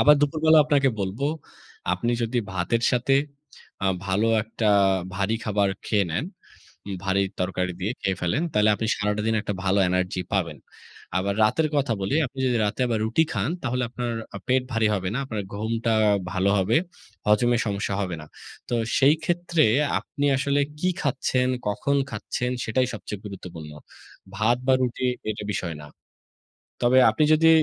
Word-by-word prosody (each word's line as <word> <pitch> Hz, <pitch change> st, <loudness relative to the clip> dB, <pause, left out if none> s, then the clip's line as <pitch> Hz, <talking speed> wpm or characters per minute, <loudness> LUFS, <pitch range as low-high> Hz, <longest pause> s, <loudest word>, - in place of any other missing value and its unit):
আবার 150 Hz, -, +7 dB
দুপুরবেলা 155 Hz, +2 st, +4 dB
আপনাকে 145 Hz, -2 st, +3 dB
বলবো, 100 Hz, +8 st, -2 dB, 0.7 s
আপনি 115 Hz, +7 st, 0 dB
যদি 115 Hz, +2 st, 0 dB
ভাতের 95 Hz, +6 st, 0 dB
সাথে 125 Hz, +2 st, +2 dB, 0.7 s
আ -, -, +3 dB, 0.2 s
ভালো 95 Hz, +4 st, +1 dB, 0.2 s
একটা 110 Hz, -1 st, -1 dB, 0.4 s
ভারী 100 Hz, +4 st, 0 dB
খাবার 100 Hz, -2 st, +1 dB, 0.2 s
খেয়ে 100 Hz, -4 st, +2 dB
নেন, 90 Hz, -, -1 dB, 0.8 s
ভারী 100 Hz, 0 st, +2 dB, 0.2 s
তরকারি 90 Hz, 0 st, -1 dB
দিয়ে 100 Hz, +5 st, -1 dB
খেয়ে 95 Hz, -1 st, -1 dB
ফেলেন, 90 Hz, -, 0 dB
তাইলে 105 Hz, 0 st, +4 dB
আপনি 110 Hz, -, -3 dB
সারাটা 105 Hz, 0 st, -1 dB
দিন, 115 Hz, -, +2 dB
একটা 105 Hz, -, -3 dB
ভালো 95 Hz, +1 st, +2 dB
এনার্জি 90 Hz, 0 st, 0 dB
পাবেন। 85 Hz, -7 st, -1 dB, 0.6 s
আবার 100 Hz, +1 st, -1 dB
রাতের 155 Hz, +9 st, +2 dB
কথা 140 Hz, -4 st, +1 dB
বলি, 95 Hz, +7 st, -1 dB
আপনি 135 Hz, +2 st, -13 dB
যদি 125 Hz, -2 st, +2 dB
রাতে 105 Hz, -, -3 dB
আবার 115 Hz, -2 st, 0 dB
রুটি 120 Hz, +8 st, +3 dB
খান, -, -, -1 dB
তাহলে 125 Hz, -1 st, -1 dB
আপনার 120 Hz, -1 st, -3 dB, 0.2 s
আ -, -, -4 dB
পেট 130 Hz, 0 st, +3 dB
ভারী 115 Hz, -1 st, +2 dB
হবে 95 Hz, -2 st, -2 dB
না, 125 Hz, -, -1 dB
আপনার 110 Hz, -5 st, -3 dB
ঘুমটা 115 Hz, +2 st, -1 dB, 0.4 s
ভালো 95 Hz, +1 st, +2 dB
হবে, 95 Hz, +5 st, +2 dB, 0.5 s
হজমের 115 Hz, +3 st, +3 dB
সমস্যা 100 Hz, -1 st, -2 dB
হবে 90 Hz, -2 st, -3 dB
না। 75 Hz, -, -10 dB, 0.4 s
তো 120 Hz, -, -1 dB, 0.2 s
সেই 140 Hz, +2 st, +6 dB
ক্ষেত্রে 170 Hz, -2 st, +1 dB, 0.4 s
আপনি 145 Hz, 0 st, -3 dB
আসলে 140 Hz, +1 st, +1 dB, 0.2 s
কি 180 Hz, -, +1 dB
খাচ্ছেন, 130 Hz, -2 st, 0 dB, 0.2 s
কখন 125 Hz, +8 st, 0 dB
খাচ্ছেন? 125 Hz, -2 st, -3 dB
সেটাই 125 Hz, +4 st, +1 dB
সবচেয়ে 105 Hz, -3 st, -7 dB
গুরুত্বপূর্ণ। 90 Hz, -6 st, -8 dB, 0.7 s
ভাত 110 Hz, +3 st, +3 dB
বা 135 Hz, -, +4 dB
রুটি, 125 Hz, +1 st, -1 dB, 0.2 s
এটা 105 Hz, -1 st, -5 dB
বিষয় 85 Hz, -3 st, -3 dB
না। -, -, -10 dB, 1.0 s
তবে 125 Hz, +2 st, +5 dB
আপনি 130 Hz, +8 st, +1 dB
যদি 160 Hz, +1 st, +5 dB
110 Hz, 160 wpm, -25 LUFS, 100-130 Hz, 1.0 s, আবার